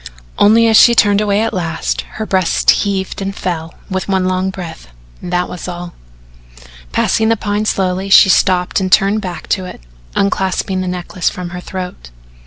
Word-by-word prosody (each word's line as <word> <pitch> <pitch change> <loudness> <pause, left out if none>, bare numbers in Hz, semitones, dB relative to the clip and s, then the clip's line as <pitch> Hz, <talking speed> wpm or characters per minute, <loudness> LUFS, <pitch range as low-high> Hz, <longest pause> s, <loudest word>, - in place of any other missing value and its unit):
Only 225 +3 +5
as 220 -1 +5
she 235 - +7
turned 205 -2 +4
away 205 0 +1
at 225 - -1
last 165 -3 -2 0.2
her 220 - -3
breast 190 -4 +2
heaved 195 -1 -2
and 195 0 -4
fell 165 -2 -4
with 190 -1 -3
one 190 -2 0
long 185 +1 0
breath 175 -4 -8 0.3
that 180 0 -1
was 180 - -7
all. 175 -1 -7 1.0
Passing 220 - +1
the 225 - +2
Pine 205 +1 -2
slowly, 190 -1 -1
she 195 - +8
stopped 180 0 +2
and 185 -1 -2
turned 205 +2 +3
back 175 -5 -6
to 190 -2 0
it, - - -9 0.4
unclasping 190 -1 0
the 185 - -3
necklace 180 0 -2
from 180 -1 -7
her 180 0 -6
throat. 180 - -7
190 Hz, 175 wpm, -15 LUFS, 180-200 Hz, 1.0 s, she